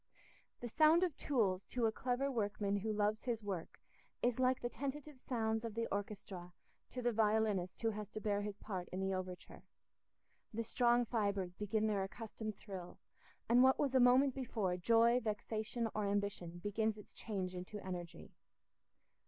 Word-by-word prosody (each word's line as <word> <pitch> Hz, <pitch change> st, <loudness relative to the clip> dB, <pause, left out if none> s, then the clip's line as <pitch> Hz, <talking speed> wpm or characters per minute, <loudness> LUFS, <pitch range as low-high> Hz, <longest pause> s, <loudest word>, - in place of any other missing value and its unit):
The 240 Hz, -, -3 dB
sound 310 Hz, +8 st, +5 dB
of 345 Hz, -6 st, 0 dB
tools 200 Hz, -9 st, +1 dB
to 245 Hz, -2 st, 0 dB
a 220 Hz, -, +3 dB
clever 255 Hz, +4 st, -1 dB
workman 205 Hz, -3 st, 0 dB
who 215 Hz, +2 st, -1 dB
loves 210 Hz, +2 st, 0 dB
his 230 Hz, -3 st, -1 dB
work 190 Hz, -5 st, -4 dB, 0.4 s
is 245 Hz, 0 st, +2 dB
like 255 Hz, 0 st, +3 dB
the 240 Hz, -, -2 dB
tentative 280 Hz, +3 st, -5 dB
sounds 225 Hz, -2 st, -1 dB
of 225 Hz, -2 st, -4 dB
the 230 Hz, 0 st, 0 dB
orchestra 195 Hz, -3 st, -5 dB, 0.4 s
to 250 Hz, -, -5 dB
the 240 Hz, -, +3 dB
violinist 215 Hz, -4 st, +1 dB
who 225 Hz, -, +3 dB
has 210 Hz, -1 st, -5 dB
to 215 Hz, -, -5 dB
bear 205 Hz, -1 st, 0 dB
his 205 Hz, -1 st, -4 dB
part 190 Hz, -4 st, -5 dB
in 185 Hz, -, -4 dB
the 190 Hz, 0 st, 0 dB
overture: 185 Hz, -1 st, -6 dB, 0.9 s
the 230 Hz, +1 st, -2 dB
strong 240 Hz, +1 st, +3 dB
fibres 200 Hz, -6 st, 0 dB
begin 210 Hz, +3 st, 0 dB
their 210 Hz, -2 st, +1 dB
accustomed 215 Hz, 0 st, -6 dB
thrill, 185 Hz, -4 st, -8 dB, 0.5 s
and 240 Hz, +2 st, +6 dB
what 265 Hz, +1 st, +6 dB
was 275 Hz, -2 st, +1 dB
a 260 Hz, -, +5 dB
moment 255 Hz, +2 st, +6 dB
before 220 Hz, -8 st, -1 dB
joy, 230 Hz, +6 st, +4 dB
vexation, 220 Hz, +1 st, -2 dB
or 210 Hz, -1 st, 0 dB
ambition, 200 Hz, -4 st, -2 dB
begins 215 Hz, +1 st, 0 dB
its 210 Hz, -, -13 dB
change 190 Hz, -4 st, -3 dB
into 185 Hz, +3 st, -6 dB
energy. 175 Hz, -2 st, -6 dB
215 Hz, 170 wpm, -37 LUFS, 200-240 Hz, 0.9 s, and